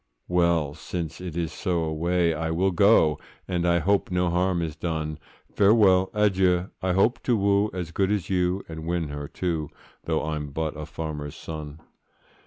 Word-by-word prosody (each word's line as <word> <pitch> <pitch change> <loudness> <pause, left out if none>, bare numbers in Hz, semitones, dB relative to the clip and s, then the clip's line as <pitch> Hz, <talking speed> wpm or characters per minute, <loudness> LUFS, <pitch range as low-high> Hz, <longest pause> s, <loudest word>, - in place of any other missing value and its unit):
'Well! 85 -4 +2
since 80 +1 -5
it 90 -3 -6
is 85 -2 -2
so, 85 -3 -1
away 85 +2 +1
I 80 +1 -2
will 90 +4 +1
go,— 85 -5 +4 0.3
And 90 -2 0
I 85 0 +4
hope 100 +5 +1
no 90 -1 +1
harm 90 0 +1
is 80 -2 -4
done; 80 -3 -3 0.3
Farewell, 100 -3 +5
adieu!—I 95 -3 +1
hope 105 +7 +2
to 120 -3 +1
woo 100 +1 +2
As 90 -3 -5
good 95 +2 +1
as 105 -4 -1
you,—and 90 -3 -2
win 85 -3 -1
her, 75 0 -5
too, 80 -4 -3 0.4
Though - - 0
I'm 75 -2 -3
but 80 +2 -3
a 75 0 -6
farmer's 75 -3 -5
son. 75 -1 -8
85 Hz, 165 wpm, -25 LUFS, 80-95 Hz, 0.4 s, Farewell